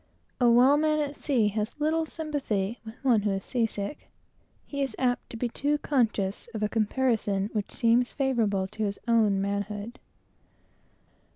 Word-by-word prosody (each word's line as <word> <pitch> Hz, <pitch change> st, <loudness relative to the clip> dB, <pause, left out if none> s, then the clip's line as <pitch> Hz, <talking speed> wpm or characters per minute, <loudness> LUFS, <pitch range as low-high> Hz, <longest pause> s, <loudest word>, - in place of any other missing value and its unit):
A 245 Hz, -2 st, +5 dB
well 250 Hz, +5 st, +6 dB
man 305 Hz, 0 st, +2 dB
at 290 Hz, -1 st, -2 dB
sea 240 Hz, -9 st, +1 dB
has 215 Hz, +6 st, -3 dB
little 315 Hz, +2 st, +1 dB
sympathy 255 Hz, -10 st, -2 dB
with 220 Hz, 0 st, -9 dB
one 240 Hz, -5 st, +4 dB
who 205 Hz, -, 0 dB
is 195 Hz, -1 st, -2 dB
seasick; 225 Hz, 0 st, -3 dB, 0.6 s
he 280 Hz, -1 st, -4 dB
is 270 Hz, -, -1 dB
too -, -, -4 dB
apt 245 Hz, -1 st, 0 dB
to 230 Hz, -, -7 dB
be 245 Hz, -, -1 dB, 0.3 s
conscious 225 Hz, -8 st, 0 dB
of 215 Hz, -, -2 dB
a 210 Hz, -, +1 dB
comparison 215 Hz, -3 st, 0 dB, 0.6 s
favorable 230 Hz, -8 st, 0 dB
to 215 Hz, +2 st, -4 dB
his 200 Hz, -1 st, -1 dB
own 220 Hz, -4 st, +3 dB
manhood. 205 Hz, +3 st, -3 dB
230 Hz, 150 wpm, -27 LUFS, 205-270 Hz, 0.6 s, well